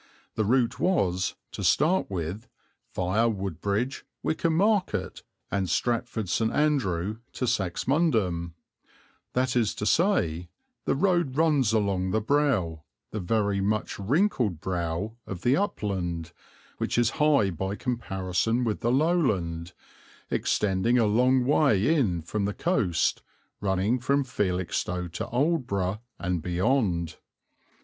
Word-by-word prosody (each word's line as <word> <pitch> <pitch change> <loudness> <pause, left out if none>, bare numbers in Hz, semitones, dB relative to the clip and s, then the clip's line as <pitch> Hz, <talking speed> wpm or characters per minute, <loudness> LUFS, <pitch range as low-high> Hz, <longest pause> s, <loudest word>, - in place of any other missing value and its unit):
The 110 - 0
route 120 +2 +2
was, 95 - +1 0.2
to - - -6
start 170 +6 +3
with, 95 +4 -4 0.5
viâ 105 +6 +2
Woodbridge, 100 - -2 0.2
Wickham 160 0 0
Market, 195 - +1 0.3
and 95 -3 0
Stratford 115 +2 -1
St. 110 +6 +1
Andrew 110 - 0 0.2
to 125 - -2
Saxmundham; 105 - 0 0.8
that 125 0 +1
is 115 -3 +1
to 105 - -3
say, 90 - +1 0.4
the - - +1
road 170 -4 +1
runs 150 -8 +3
along 100 -4 +1
the 110 - +1
brow, 110 - +1 0.3
the 110 - -3
very 100 +1 0
much 105 +2 -1
wrinkled 120 - +1
brow, 90 +5 -3
of 90 -3 -6
the 125 +3 +4
upland, 95 - -2 0.5
which - - -1
is 120 -1 +3
high 140 -10 +4
by 95 +4 -3
comparison 115 -1 -1
with 110 -3 -1
the 120 - 0
lowland, 105 - +1 0.6
extending 105 +4 +1
a 115 - +4
long 125 +4 +3
way 140 -2 +3
in 95 - +1
from 100 +5 -2
the 105 - -2
coast, 105 - +1 0.4
running 100 +5 +1
from 140 +3 +1
Felixstowe 90 -6 -2
to 85 - -5
Aldeburgh 120 - 0 0.2
and 90 -2 -2
beyond. 90 - 0
105 Hz, 125 wpm, -27 LUFS, 90-130 Hz, 0.8 s, the